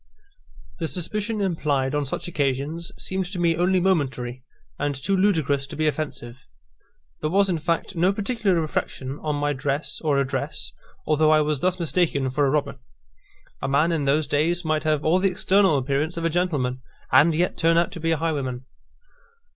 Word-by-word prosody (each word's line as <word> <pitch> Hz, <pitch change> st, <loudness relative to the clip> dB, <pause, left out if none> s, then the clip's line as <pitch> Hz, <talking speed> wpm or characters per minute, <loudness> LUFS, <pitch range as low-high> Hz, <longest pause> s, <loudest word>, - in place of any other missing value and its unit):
The 165 Hz, -, -1 dB
suspicion 210 Hz, +6 st, -3 dB
implied 150 Hz, -8 st, 0 dB
on 145 Hz, -1 st, 0 dB
such -, -, -4 dB
occasions 150 Hz, +2 st, -2 dB
seemed 190 Hz, -1 st, -2 dB
to 185 Hz, -1 st, -5 dB
me 170 Hz, -1 st, +2 dB
only 180 Hz, +2 st, +2 dB
momentary, 135 Hz, -9 st, -1 dB, 0.4 s
and 145 Hz, 0 st, -1 dB
too 150 Hz, +9 st, -1 dB
ludicrous 160 Hz, -8 st, +1 dB
to 155 Hz, -, -8 dB
be 155 Hz, +1 st, 0 dB
offensive. 140 Hz, -5 st, -3 dB, 0.8 s
There 155 Hz, -, 0 dB
was, 195 Hz, +3 st, +3 dB
in 170 Hz, -, -1 dB
fact, 165 Hz, +3 st, -2 dB
no 175 Hz, +3 st, +3 dB
particular 205 Hz, -3 st, 0 dB
reflection 140 Hz, -3 st, -3 dB
on 150 Hz, -1 st, -2 dB
my 145 Hz, 0 st, 0 dB
dress 140 Hz, +2 st, -2 dB
or 150 Hz, -3 st, +2 dB
address, 140 Hz, -1 st, -1 dB, 0.3 s
although 155 Hz, 0 st, +3 dB
I 155 Hz, 0 st, +5 dB
was 150 Hz, -2 st, 0 dB
thus 185 Hz, 0 st, +1 dB
mistaken 160 Hz, -6 st, 0 dB
for 145 Hz, +1 st, +2 dB
a -, -, +2 dB
robber. 140 Hz, -1 st, -1 dB, 0.8 s
A -, -, -1 dB
man 145 Hz, +5 st, +2 dB
in 155 Hz, -4 st, 0 dB
those 145 Hz, +3 st, +2 dB
days 165 Hz, +5 st, 0 dB
might 155 Hz, 0 st, 0 dB
have 155 Hz, -1 st, +1 dB
all 170 Hz, +4 st, +4 dB
the 195 Hz, +1 st, +3 dB
external 190 Hz, -3 st, +3 dB
appearance 140 Hz, +5 st, -1 dB
of 165 Hz, -, -2 dB
a 165 Hz, -, +1 dB
gentleman, 145 Hz, -8 st, -1 dB, 0.3 s
and 160 Hz, +1 st, +5 dB
yet 175 Hz, +3 st, +1 dB
turn 165 Hz, 0 st, +3 dB
out 170 Hz, 0 st, +2 dB
to -, -, -7 dB
be 165 Hz, 0 st, -1 dB
a 165 Hz, -, +2 dB
highwayman. 140 Hz, -6 st, -2 dB
155 Hz, 180 wpm, -24 LUFS, 140-175 Hz, 0.8 s, I